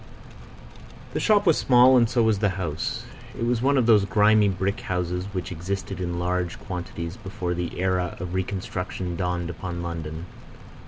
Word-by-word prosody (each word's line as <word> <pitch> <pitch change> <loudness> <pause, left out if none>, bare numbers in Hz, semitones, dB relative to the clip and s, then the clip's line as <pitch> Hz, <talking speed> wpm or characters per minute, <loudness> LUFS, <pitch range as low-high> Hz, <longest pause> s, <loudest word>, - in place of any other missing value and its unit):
The - - -1
shop 210 -2 +3
was 165 -4 +4
small, 125 0 +6
and 120 -3 +5
so 120 -1 +2
was 110 -3 +2
the 105 -1 +2
house. 80 -5 -3 0.3
It 115 - -1
was 120 -1 +1
one 140 +2 +3
of 125 - +3
those 110 -3 +6
grimy 105 +1 +4
brick 95 +3 -1
houses 90 -2 -2
which 95 -3 -5
existed 95 +2 -4
in 85 -1 -2
large 90 0 -1
quantities 85 -2 -6
before 95 -2 -4
the 90 0 -4
era 90 -1 0
of 90 0 -5
reconstruction 95 -1 -3
dawned 90 -1 -2
upon 90 -1 -5
London. 80 -1 -5
95 Hz, 165 wpm, -25 LUFS, 90-105 Hz, 0.3 s, small